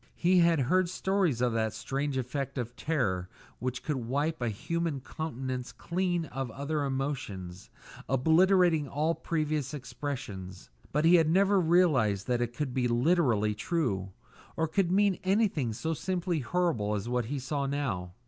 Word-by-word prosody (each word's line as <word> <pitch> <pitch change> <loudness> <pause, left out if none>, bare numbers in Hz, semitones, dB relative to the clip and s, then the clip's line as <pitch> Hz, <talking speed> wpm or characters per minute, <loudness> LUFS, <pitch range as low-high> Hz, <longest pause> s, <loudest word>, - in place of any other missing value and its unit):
He 180 +1 +3
had 170 -3 +4
heard 180 +7 +2
stories 185 - 0
of 125 -2 +2
that 110 -1 0
strange 140 0 -2
effect 135 +2 -3
of 120 -1 -4
terror 95 - -1 0.3
which 125 +1 -3
could 150 -3 -1
wipe 140 +6 -1
a 120 - 0
human 165 +7 -2
countenance 130 -3 -5
clean 175 -1 -1
of 135 -4 -4
other 145 +4 -2
emotions, 130 -10 -4 0.4
obliterating 160 +3 +4
all 155 +4 0
previous 155 -4 -2
expressions; 105 - -6 0.2
but 150 +3 +1
he 175 +2 +7
had 160 -2 +3
never 195 +3 +4
realised 150 - +3
that 120 -1 0
it 120 0 -2
could 135 -1 -2
be 125 -1 +1
literally 120 - +2
true, 105 - -1 0.5
or 160 - +1
could 180 +2 +1
mean 200 0 +3
anything 190 - +1
so 160 +9 -2
simply 175 0 -1
horrible 125 -8 0
as 105 +2 -3
what 125 -1 0
he 140 +6 -3
now - - -2
saw. 135 -8 -2
140 Hz, 155 wpm, -29 LUFS, 120-170 Hz, 0.5 s, he